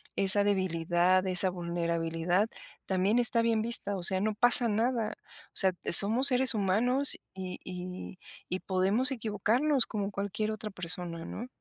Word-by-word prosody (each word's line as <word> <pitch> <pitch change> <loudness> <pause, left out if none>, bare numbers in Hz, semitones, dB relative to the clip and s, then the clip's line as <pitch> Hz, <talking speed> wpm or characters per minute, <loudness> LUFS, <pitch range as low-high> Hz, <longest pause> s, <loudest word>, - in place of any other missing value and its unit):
esa 200 +1 +4
debilidad, 185 -1 -1
esa 185 0 +2
vulnerabilidad, 170 +1 -3 0.4
también 190 +4 -1
está 235 -1 +1
bien 230 -1 -1
vista, 225 -3 +1
o 180 - -8
sea, 185 +1 +5
no 215 +1 -3
pasa 245 +2 +5
nada, 225 +1 -3 0.3
o - - -46
sea, 190 -2 +5 0.2
somos 220 +10 +7
seres 260 -1 +3
humanos, 230 +7 +2 0.2
y 185 -1 -9
y 180 0 -10 0.3
y 185 - -4
podemos 195 +8 -1
equivocarnos 235 +4 -1
como 205 -1 -6
cualquier 205 +2 -5
otra 215 0 -8
persona, 175 -2 -6
¿no? 240 - -9
200 Hz, 145 wpm, -27 LUFS, 180-225 Hz, 0.4 s, somos